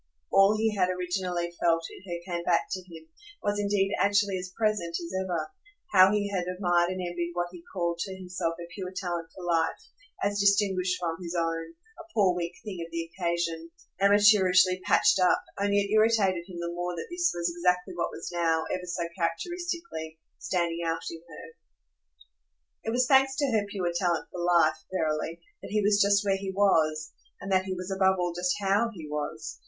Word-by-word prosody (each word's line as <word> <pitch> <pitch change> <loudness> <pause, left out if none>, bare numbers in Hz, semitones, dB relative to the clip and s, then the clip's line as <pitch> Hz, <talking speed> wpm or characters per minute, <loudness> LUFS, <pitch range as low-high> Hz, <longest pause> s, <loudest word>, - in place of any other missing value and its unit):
All 195 +2 +5
he 220 0 +1
had 185 -2 +2
originally 180 -1 -2
felt 165 -1 +3
in - - -12
her 170 - -3 0.2
came 170 - -3
back 170 -1 +2
to 190 - -2
him, 160 -1 -11 0.4
was 205 0 0
indeed 200 -1 +1
actually 200 -1 +2
as 180 0 -7
present 210 -7 0
as 170 +1 -7
ever 180 - -3 0.4
how 190 0 +8
he 205 -1 +1
had 185 -3 -1
admired 175 -1 +1
and 185 0 -4
envied 175 -1 -3
what 175 0 -1
he 180 -2 -11
called 170 -2 -1
to 190 +2 -3
himself 180 -3 -3
her 170 - -7
pure 185 -1 -5
talent 175 -3 -3
for 185 - -9
life, 165 -2 +1 0.5
as 205 +1 0
distinguished 195 -2 +2
from 165 -1 -3
his 175 0 -5
own, 165 - -2 0.2
a 335 0 -13
poor 195 -4 +4
weak 175 0 -4
thing 190 -5 -5
of 165 - -9
the 165 0 -5
occasion, 170 -2 -2 0.3
amateurishly 195 -2 +5
patched - - +4
up; 180 -1 +3 0.2
only 200 0 +2
it 200 0 -3
irritated 215 -5 +3
him 180 - -8
the 170 0 -3
more 175 0 -3
that 165 - -5
this 345 0 +1
was 170 0 -1
exactly 180 +1 +1
what 170 - -1
was 170 - -7
now, 165 -2 +1
ever 180 -1 -4
so 175 0 -2
characteristically, 195 - -3 0.2
standing 170 -2 -1
out 165 0 -2
in 165 -1 -9
her. 165 +1 -11 1.3
It - - -1
was 250 +2 +2
thanks 265 0 +4
to 280 -2 0
her 210 -3 +1
pure 185 -4 -2
talent 175 -2 0
for 180 - -5
life, 170 -3 +3
verily, 160 -1 -2 0.2
that - - -8
he 210 0 +1
was 205 0 +4
just 200 +1 +4
where 195 -1 +2
he 195 0 -5
was 160 -6 +2 0.3
and 195 +1 -6
that 190 0 +3
he 190 -1 -3
was 185 +1 -6
above 190 0 +4
all 175 -1 -1
just 180 +1 0
HOW 205 +4 +2
he 165 -8 -9
was. 150 0 -5
180 Hz, 195 wpm, -28 LUFS, 170-200 Hz, 1.3 s, how